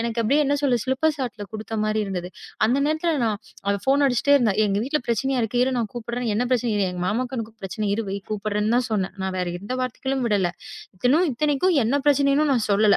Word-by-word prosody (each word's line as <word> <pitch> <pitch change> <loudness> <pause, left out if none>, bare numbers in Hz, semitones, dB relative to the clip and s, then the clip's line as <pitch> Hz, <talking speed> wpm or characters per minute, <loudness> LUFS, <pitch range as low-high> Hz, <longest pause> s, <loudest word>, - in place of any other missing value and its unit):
எனக்கு 230 0 -2
அப்படியே 280 +7 +3
என்ன 285 +1 +2
சொல்றது 245 -5 +2
சிலிப்பர் 300 +4 +1
ஷாட் 250 -3 -4 0.2
கொடுத்த 220 0 -4
மாரி 215 0 0
இருந்தது. 180 -2 -4 0.4
அந்த 255 +4 +2
நேரத்துல 315 +1 0
நான் 215 -2 -1 0.3
அவ 200 - +3
ஃபோன் 280 +1 +4
அடிச்சிட்டே 265 +3 +3
இருந்தா. 225 -7 +2
"எங்க 195 - 0
வீட்டுல 300 +3 0
பிரச்சனை 265 +4 0
இருக்கு 225 +2 -2
இரு 260 +1 +1
நான் 220 -3 -2
கூப்பிடறேன்" 240 0 -3
"என்ன 240 - +1
பிரச்சனை?" 240 -2 +1 0.2
"எங்க 180 0 -5
மாமாக்கு 250 +4 -2
இன்னும் 225 -1 -7
பிரச்சனை 210 +3 -3
இருக்கு 210 -2 -3
வை 200 - -2
கூப்பிடறேன்னு 210 +2 0
தான் 250 0 +1
சொன்னேன். 195 -2 -1
நான் 190 0 -2
வேற 180 -1 -1
எந்த 205 +6 -6
வார்த்தைகளும் 260 +1 -2
விடல. 200 -5 +2 0.6
இன்னும் 315 +8 +4
இத்தனைக்கும் 300 +7 +1
என்ன 230 +5 +1
பிரச்சனைன்னு 280 +1 +3
நான் 235 -4 +1
சொல்லல. 205 0 +5
235 Hz, 210 wpm, -23 LUFS, 210-270 Hz, 0.6 s, சொல்லல